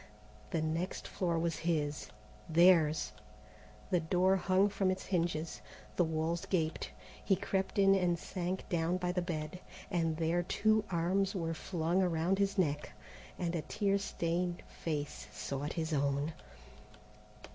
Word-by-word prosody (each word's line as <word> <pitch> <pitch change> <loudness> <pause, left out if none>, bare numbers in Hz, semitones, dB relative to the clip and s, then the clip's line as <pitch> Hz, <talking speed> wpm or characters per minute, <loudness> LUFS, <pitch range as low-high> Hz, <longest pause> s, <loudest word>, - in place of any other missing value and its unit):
The 165 -4 0
next 165 +4 -2
floor 170 -3 -1
was 165 -1 0
his, 150 -3 -1 0.4
theirs. 160 -4 +5 0.8
The 180 - +4
door 180 +4 +3
hung 190 +2 +3
from 195 -1 +1
its 185 0 -2
hinges, 170 -3 -1 0.3
the 175 - +4
walls 160 +1 -1
gaped. 160 -4 0 0.3
He 195 - +3
crept 190 +1 -2
in 195 -1 +6
and 180 -3 +2
sank 185 +1 -4
down 170 +1 +1
by 180 -1 -1
the 180 0 0
bed, 165 -1 -4 0.3
and 165 -3 +1
there 165 +2 +1
two 215 +4 +2
arms 190 +3 +1
were 165 -3 -1
flung 170 +2 0
around 180 +1 +1
his 200 +1 +1
neck, 150 -5 0 0.4
and 175 -1 -1
a 165 - 0
tear 200 +6 0
stained 175 -2 -2
face 150 -3 -4
sought 140 +2 -4
his 160 -1 -2
own. 140 +2 +1
170 Hz, 140 wpm, -33 LUFS, 160-185 Hz, 0.8 s, in